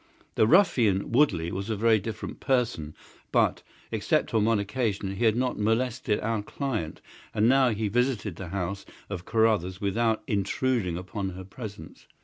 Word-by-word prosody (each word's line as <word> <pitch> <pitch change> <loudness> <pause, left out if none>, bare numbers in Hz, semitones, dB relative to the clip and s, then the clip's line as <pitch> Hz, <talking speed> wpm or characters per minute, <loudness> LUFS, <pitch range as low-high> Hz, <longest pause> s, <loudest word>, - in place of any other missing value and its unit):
The 110 - +3
ruffian 120 - +3
Woodley 115 - +2
was 100 +3 -4
a 110 - 0
very 110 +1 +3
different 110 +2 -6
person, 120 - 0 0.4
but, - - +2 0.3
except - - 0
on 110 -2 +3
one 115 0 +3
occasion, 100 -2 -2
he 120 - +1
had 110 -1 +4
not 125 -1 -1
molested 115 +1 0
our 110 0 -1
client, 110 - -4 0.3
and 110 +1 +3
now 130 0 +5
he 110 -1 -1
visited 115 -4 0
the 95 - -6
house 100 +2 -3 0.3
of 90 -2 -5
Carruthers 110 -5 +1
without 110 +2 0
intruding 100 -2 0
upon 95 +2 -4
her 95 0 -8
presence. 100 -3 -10
110 Hz, 155 wpm, -27 LUFS, 95-120 Hz, 0.4 s, now